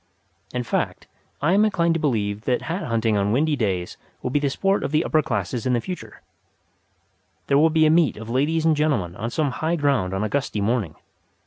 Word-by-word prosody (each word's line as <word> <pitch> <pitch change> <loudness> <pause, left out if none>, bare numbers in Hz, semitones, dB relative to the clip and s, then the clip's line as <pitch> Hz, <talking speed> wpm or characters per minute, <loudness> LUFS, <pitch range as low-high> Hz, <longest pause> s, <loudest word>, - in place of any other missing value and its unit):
In 125 0 -2
fact, 115 - -2 0.4
I 170 +5 +3
am 205 +2 +5
inclined 170 -6 +2
to 165 - -1
believe 105 -8 -1
that 125 -2 0
hat 175 +5 -3
hunting 115 -2 +1
on 100 +1 +1
windy 150 +6 +2
days 95 -8 -2 0.3
will 125 - -2
be 145 - +2
the 145 -1 0
sport 195 +8 0
of - - -2
the 155 +2 +2
upper 155 - +2
classes 110 -1 -2
in 125 - +2
the 120 - +2
future. 180 +9 -8 1.2
There 140 - +3
will 160 +2 +5
be 160 0 +3
a 155 - +5
meet 160 -8 +3
of 110 +1 -8
ladies 150 +7 0
and 160 -1 +4
gentlemen 120 - 0
on 110 +3 -4
some 145 +2 0
high 160 +6 -1
ground 135 - +1
on 95 - -1
a - - 0
gusty 140 -4 -2
morning. 100 -6 -1
135 Hz, 215 wpm, -23 LUFS, 110-155 Hz, 1.2 s, am